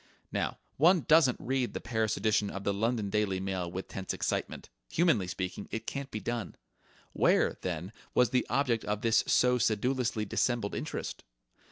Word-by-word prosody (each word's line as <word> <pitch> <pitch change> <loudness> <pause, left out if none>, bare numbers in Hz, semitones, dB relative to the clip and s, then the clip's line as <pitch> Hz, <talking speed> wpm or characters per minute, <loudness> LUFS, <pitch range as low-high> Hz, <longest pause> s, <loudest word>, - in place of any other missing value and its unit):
Now - - -1 0.2
one 170 +4 +5
doesn't 155 -4 +5
read 130 -1 -1
the - - -1
Paris 110 -2 -1
edition 105 -1 +1
of 100 - -6
the 100 - +1
London 110 0 -1
Daily 100 -3 +1
Mail 95 -2 -2
with 95 +2 -5
tense 95 -1 -4
excitement. - - -2 0.2
Humanly 155 - +2
speaking, 95 +2 -4
it 115 - -4
can't 140 -1 -4
be 110 - -4
done. 120 -1 -4 0.6
Where, - - +3
then, 90 +1 -3 0.2
was 125 -2 +4
the 125 -1 +1
object 125 -5 +1
of 105 0 -2
this 115 -1 +3
so 125 0 +4
sedulously 115 0 +1
dissembled 115 0 0
interest? - - -4
110 Hz, 165 wpm, -30 LUFS, 100-125 Hz, 0.6 s, one